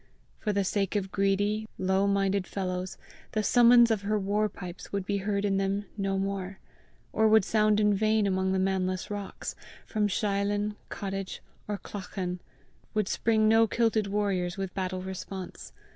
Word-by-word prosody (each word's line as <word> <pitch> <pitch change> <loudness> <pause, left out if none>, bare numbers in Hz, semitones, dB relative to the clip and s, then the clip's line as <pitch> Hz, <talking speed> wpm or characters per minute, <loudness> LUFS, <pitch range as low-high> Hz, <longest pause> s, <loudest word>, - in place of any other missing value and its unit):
For 210 - -1
the 200 -1 +1
sake 195 +1 -1
of 195 -2 -1
greedy, 205 +2 +1
low 190 +1 +2
minded 195 -1 +1
fellows, 185 -1 -3 0.4
the 215 - +1
summons 240 +1 +6
of 215 -3 +1
her 210 +1 0
war 210 +2 +1
pipes 180 -2 -9
would 200 -2 -2
be 200 +1 0
heard 200 +1 -1
in 195 -1 +1
them 195 +1 0
no 195 -2 -1
more, 195 -1 -3 0.6
or 220 0 +4
would 215 -2 +5
sound 215 -1 +3
in 210 -1 +4
vain 215 +1 +2
among 190 -1 +1
the 190 - +1
manless 185 0 0
rocks; 205 -1 -5 0.3
from 210 -2 0
sheilin, 205 +1 0
cottage, 195 -1 -5 0.2
or 205 -1 -2
clachan, 185 -3 -5 0.6
would 210 -3 +1
spring 220 0 +2
no 225 +1 +5
kilted 225 -2 +1
warriors 195 -3 -1
with 195 -1 -4
battle 185 -1 -3
response! 190 0 -7
200 Hz, 160 wpm, -28 LUFS, 190-210 Hz, 0.6 s, summons